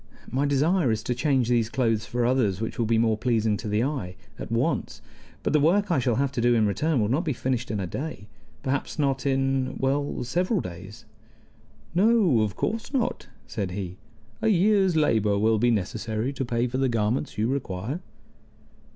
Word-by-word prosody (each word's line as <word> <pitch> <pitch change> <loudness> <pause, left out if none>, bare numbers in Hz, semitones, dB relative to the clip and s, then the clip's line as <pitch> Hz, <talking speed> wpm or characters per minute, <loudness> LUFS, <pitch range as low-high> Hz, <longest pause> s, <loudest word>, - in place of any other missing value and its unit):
My 140 +3 +1
desire 150 +2 +2
is 110 -1 -1
to 125 - -1
change 130 -1 +1
these 120 -2 +2
clothes 115 -4 0
for 120 0 0
others 120 -7 +1
which 110 +2 -4
will 115 - +1
be 115 0 +2
more 110 -1 +2
pleasing 110 -3 +1
to 105 - -6
the 105 +2 +1
eye, 125 -11 -3 0.2
at - - -7
once; - - -1 0.4
but - - 0
the 155 - +5
work 185 +6 +3
I 160 - +3
shall 120 -2 +1
have 140 +1 0
to 125 - -2
do 120 0 +4
in 110 -2 +3
return 140 - +1
will 105 - +2
not 135 +10 +1
be 155 -5 -1
finished 125 0 -2
in 105 - -2
a 95 - -2
day. 130 - -6 0.4
Perhaps 140 +4 -2
not 140 -2 0
in 135 -1 0
well, 140 0 -1
several 180 - 0
days." 95 - -8 0.9
"No, 190 - +4
of 105 -3 -1
course 225 +4 -2
not," 260 -4 -1 0.2
said 100 -4 -3
he. 95 -2 -5 0.4
"A - - +1
year's 195 -2 +3
labor 110 -9 +2
will 110 +1 +2
be 120 +2 +3
necessary 110 +3 -1
to 135 - -3
pay 120 -1 0
for 125 +1 -2
the 135 -1 +2
garments 115 +4 -1
you 110 +2 +1
require." 125 - -3
125 Hz, 195 wpm, -26 LUFS, 110-145 Hz, 0.9 s, the